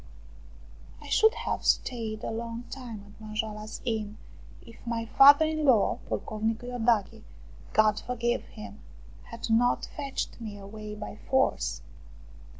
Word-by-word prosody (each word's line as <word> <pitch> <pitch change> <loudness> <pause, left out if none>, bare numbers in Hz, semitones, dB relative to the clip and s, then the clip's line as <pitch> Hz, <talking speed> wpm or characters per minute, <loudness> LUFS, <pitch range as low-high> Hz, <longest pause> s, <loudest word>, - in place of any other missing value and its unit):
I 295 -1 -11
should 440 - +5
have - - -3
stayed 220 -3 0
a - - -2
long 230 +1 -4
time 240 -6 -7
at 205 +2 -17
Manjoala's 215 0 -5
Inn 215 -3 -2 0.5
if 230 0 -14
my 230 -1 -1
father 285 +6 +8
in 310 0 -1
law, 250 -8 +4
Pocovnicu 220 +2 -2
lordache, 235 -4 0 0.5
God 215 -1 +4
forgive 240 -1 -1
him, 215 -1 -10 0.5
had 230 0 -5
not 240 +2 +3
fetched 275 -4 -4
me 210 -3 -6
away 210 +1 -8
by 210 0 -7
force. 65 - +1
225 Hz, 130 wpm, -28 LUFS, 215-245 Hz, 0.5 s, father